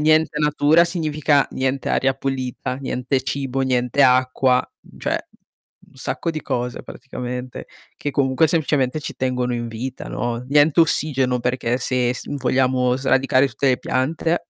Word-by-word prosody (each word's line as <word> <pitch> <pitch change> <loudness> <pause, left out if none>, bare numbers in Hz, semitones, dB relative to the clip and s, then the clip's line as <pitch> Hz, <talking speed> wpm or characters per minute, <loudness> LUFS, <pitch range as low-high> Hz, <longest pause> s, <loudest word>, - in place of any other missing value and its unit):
Niente 155 0 +3
natura 150 +2 +4
significa 155 -4 +1
niente 130 +1 -1
aria 135 0 +2
pulita, 130 -2 -3
niente 130 0 -2
cibo, 135 -1 -2
niente 125 +1 +1
acqua, 130 0 +3 0.3
cioè - - -1 0.7
un - - -25
sacco 130 +5 -3
di 155 - -5
cose 125 0 -3
praticamente 125 -1 -7 0.3
che 145 - -3
comunque 140 +3 +2
semplicemente 145 -3 +1
ci 150 - -6
tengono 125 -1 -1
in 120 0 -3
vita, 125 +3 -6
no, 120 -1 -2
niente 145 +3 +4
ossigeno 135 -5 +1
perché 125 0 -1
se 125 -1 0
s 125 - -7
vogliamo 130 -2 +1
sradicare 135 0 +3
tutte 135 +3 0
le 125 - +2
piante. 160 +6 -1
130 Hz, 140 wpm, -21 LUFS, 125-145 Hz, 0.7 s, natura